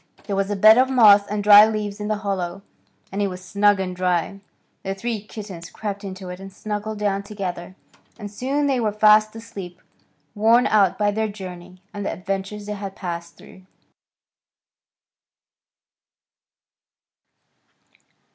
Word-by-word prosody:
There 200 - -4
was 195 0 -1
a 205 - -1
bed 215 +4 +7
of 260 +1 +3
moss 210 -6 +6
and 205 0 -3
dry 205 0 +9
leaves 210 -1 -4
in 210 - -4
the 215 - 0
hollow, 190 -1 -3 0.5
and 200 - -3
it 200 - +1
was 185 -1 -8
snug 205 +1 +2
and 185 -1 -3
dry. 180 +1 -1 0.4
The 195 0 -4
three 225 +1 -4
kittens 200 -5 -9
crept 205 -1 -6
into 190 -1 -7
it 180 0 -8
and 195 0 -10
snuggled 210 +2 -5
down 200 -1 -1
together, 190 -3 -6 0.4
and 205 -3 -8
soon 270 +7 -1
they 270 -3 +1
were 220 -3 0
fast 215 +1 +4
asleep, 200 -6 -9 0.5
worn 230 +4 +4
out 200 -4 +3
by 205 -1 +1
their 220 +1 -1
journey 185 -2 -10
and 205 -1 -5
the - - -2
adventures 195 +2 -5
they 210 - -4
had 200 -1 -7
passed 170 -2 -6
through. 190 - -16
205 Hz, 150 wpm, -22 LUFS, 190-215 Hz, 0.5 s, dry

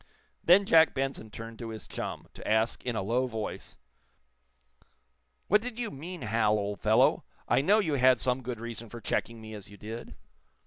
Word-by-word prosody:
Then 190 +4 +6
Jack 160 -3 +5
Benson 135 -4 -3
turned 115 +1 -9
to 115 - -5
his 110 -3 -8
chum, - - -5
to - - -9
ask, 110 +1 +1
in 125 -2 -2
a 95 - -1
low 125 +5 +1
voice: 110 -3 -6 1.7
"What 210 +2 +4
did 240 0 -6
you 235 -3 -3
mean, 165 +3 -7
Hal, 110 -1 +2
old 100 0 -3
fellow? - - +4 0.2
I 120 +3 +3
know 200 +9 +4
you 180 -9 +1
had 130 -1 +5
some 125 +1 0
good 120 -2 -5
reason 115 -1 -7
for 120 - -8
checking 115 +2 -2
me 110 0 -9
as 105 -1 -9
you 100 - -13
did." 110 +4 -8
120 Hz, 185 wpm, -29 LUFS, 110-140 Hz, 1.7 s, Then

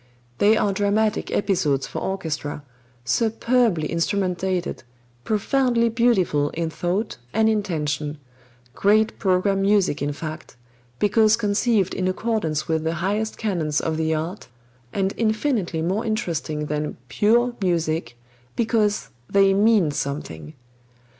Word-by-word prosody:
They 215 +2 +5
are 200 - +1
dramatic 205 +2 +1
episodes 155 -9 +1
for - - -5
orchestra, 155 -6 -4 0.4
superbly 225 -6 +1
instrumentated, 180 0 -1 0.4
profoundly 235 - +1
beautiful 195 -11 +2
in 165 0 -2
thought 185 +5 -2 0.2
and 220 0 +4
intention 155 -8 -1 0.6
great 215 +6 +2
program 195 0 +2
music 195 -6 +2
in 145 +1 0
fact, 155 +2 -7 0.4
because 215 - +4
conceived 210 -2 +1
in 185 - -1
accordance 185 -6 -1
with 160 -1 0
the 160 +1 -1
highest 205 +6 -1
canons 165 -9 -1
of 160 -1 -2
the 160 0 0
art, 165 +6 -4 0.4
and 195 +4 -1
infinitely 215 - 0
more 190 +7 0
interesting 165 -8 -2
than 150 0 -3
"pure" 235 - +2
music 160 -8 -1 0.4
because 220 -3 +1 0.2
they 195 -1 +4
mean 205 -5 +4
something. 80 - -5
190 Hz, 115 wpm, -23 LUFS, 160-215 Hz, 0.6 s, They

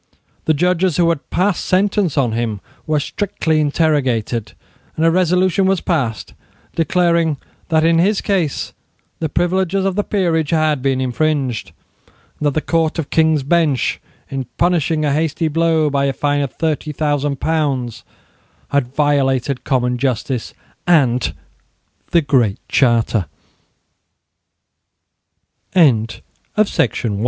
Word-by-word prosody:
The 160 - +2
judges 180 +1 +1
who 170 -1 +3
had 165 -4 -3
passed 185 0 0
sentence 190 -3 +1
on 125 -5 +2
him 110 -2 -2 0.3
were 155 -1 +2
strictly 160 -2 -1
interrogated; 130 -8 0 0.4
and 160 - +1
a 165 - +5
resolution 185 +2 +2
was 190 -1 +2
passed 130 - -2 0.4
declaring 170 -2 +1 0.3
that 160 -1 +3
in 165 0 +4
his 200 +4 +2
case 180 -8 -1 0.5
the 160 - -2
privileges 185 +4 0
of 195 -1 0
the 205 - +1
peerage 170 -8 0
had 155 -4 +1
been 135 -1 0
infringed, 130 -2 -1 0.7
and 150 - 0
that 145 - -1
the 155 - +1
Court 165 -1 +1
of 160 -4 -4
King's 160 -3 +3
Bench, 150 -3 +1 0.3
in 135 -1 -3
punishing 165 -3 +1
a 145 - +1
hasty 160 +2 0
blow 160 0 +2
by 140 0 +1
a 135 - 0
fine 145 +1 0
of 140 - -2
thirty 155 -1 -2
thousand 145 -2 -1
pounds, 140 -7 -1 0.7
had 140 -3 +2
violated 140 -3 +1
common 125 -2 0
justice 125 -1 -2
155 Hz, 115 wpm, -18 LUFS, 140-170 Hz, 0.7 s, a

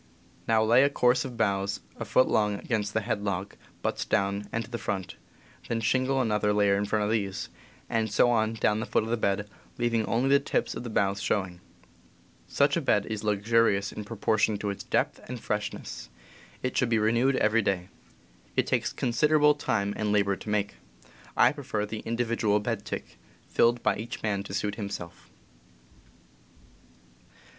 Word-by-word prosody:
Now 110 -1 +4
lay 115 +3 +5
a 140 - +4
course 125 -2 +2
of 125 -3 -7
boughs 100 -2 0 0.2
a - - -5
foot 130 - +3
long 105 -1 +2
against 105 -1 -2
the 110 - +2
head 110 -1 -2
log, 100 -1 -2 0.3
butts - - -1
down 100 +1 0
and 115 -1 -2
to 120 - -17
the 120 - -3
front, 95 -3 -3 0.5
then 115 - -1
shingle 130 +4 +1
another 105 -3 +1
layer 100 -1 +3
in 100 +1 0
front 105 0 0
of 105 - -1
these, 100 -3 -2 0.4
and 110 -2 -1
so 120 +3 +4
on 110 -1 +1
down 105 -1 +1
to - - -2
the 110 - -2
foot - - +2
of 110 - -4
the - - +3
bed, 105 -2 0 0.3
leaving 120 -2 +1
only 120 +3 +1
the 140 0 +6
tips 140 - -1
of - - -5
the 120 - -5
boughs 100 -2 0
showing. 95 -4 -1 0.9
Such - - +2
a - - 0
bed - - +2
is 110 -1 -3
luxurious 105 -1 +2
in 105 - -6
proportion 110 0 +1
to 100 0 -2
its 100 - -7
depth - - 0
and 125 -1 -5
freshness. 105 - -4 0.5
It 130 - -2
should 125 - +2
be 115 - +2
FiQ. 110 - +2
6. - - +1
renewed 120 +5 +3
every 110 0 +3
day. 95 -3 -1 0.7
It - - +2
takes - - 0
considerable 150 +5 +3
time 100 -8 -1
and 105 -1 -1
labor 100 -1 +2
to 105 - -9
make. 105 -1 -1 0.6
I - - +6
prefer 135 -8 -3
the 110 +1 -5
individual 115 -2 0
bed 105 -1 -3
tick, - - -6 0.3
filled 120 0 +2
by 105 - +2
each 110 +3 -6
man 100 -2 0
to 95 - -5
suit 105 +1 -1
himself. 100 -5 -7
110 Hz, 185 wpm, -28 LUFS, 100-115 Hz, 0.9 s, the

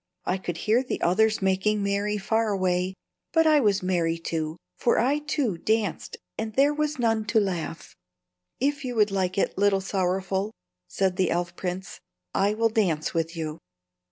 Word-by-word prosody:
I 185 +1 0
could 175 -2 -4
hear 220 +7 +2
the 260 - -3
others 215 +4 +3
making 195 +2 +1
merry 200 +1 0
far 220 +3 0
away, 185 -1 0 0.4
but 325 -1 +4
I 310 -1 +6
was 205 -7 +2
merry, 170 -3 +1
too; 160 -1 -3 0.2
for 240 - +2
I, 275 +5 +2
too, 280 - -1
danced, 215 -3 -1 0.2
and 220 -1 -3
there 280 +2 +4
was 300 -1 -1
none 225 -3 +1
to 220 - +3
laugh." 175 -5 -3 0.6
"If 285 +2 0
you 250 -2 -4
would 210 -2 +3
like 185 -1 -1
it, 195 - 0
Little 200 -1 +4
Sorrowful," 190 +2 -1 0.3
said 185 - 0
the 185 -2 +2
elf 175 0 -1
prince, 185 +1 -5 0.3
"I 205 +2 +2
will 225 +1 +2
dance 180 -9 0
with 165 0 -1
you." 155 -1 -4
195 Hz, 170 wpm, -26 LUFS, 180-225 Hz, 0.6 s, I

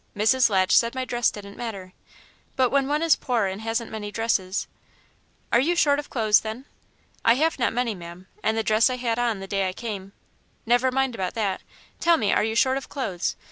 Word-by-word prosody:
Mrs. 245 +4 +4
Latch 190 -2 +3
said 235 +2 +3
my 260 0 -2
dress 240 -1 +1
didn't 200 -1 -10
matter, 195 -6 -6 0.6
but 255 -2 +2
when 275 -1 +2
one 300 +3 0
is 330 -3 +5
poor 240 -5 0
and 190 +2 -4
hasn't 225 +1 -2
many 215 -1 -5
dresses 210 -4 -1 0.4
" - - -24
"Are 235 - +6
you 330 +7 +2
short 290 -4 +3
of 295 - -7
clothes, 215 -4 +3
then?" 220 +4 -6 0.6
"I 230 - +5
have 315 +2 +1
not 240 - +2
many, 240 -1 -1
ma'am, 175 0 -10 0.2
and 220 +1 0
the 225 - +1
dress 220 +3 +3
I 255 - -2
had 240 -2 -2
on 230 -5 0
the - - -5
day 195 -1 0
I - - -6
came 200 -3 -6 0.3
" - - -40
"Never 245 +2 +3
mind 265 0 0
about 190 -5 -3
that. 200 -4 -1 0.4
Tell 340 0 +4
me, 210 -7 +1
are - - +2
you 220 +1 -1
short 260 +3 +3
of 275 - -7
clothes? 175 - -3
230 Hz, 220 wpm, -24 LUFS, 200-255 Hz, 0.6 s, Are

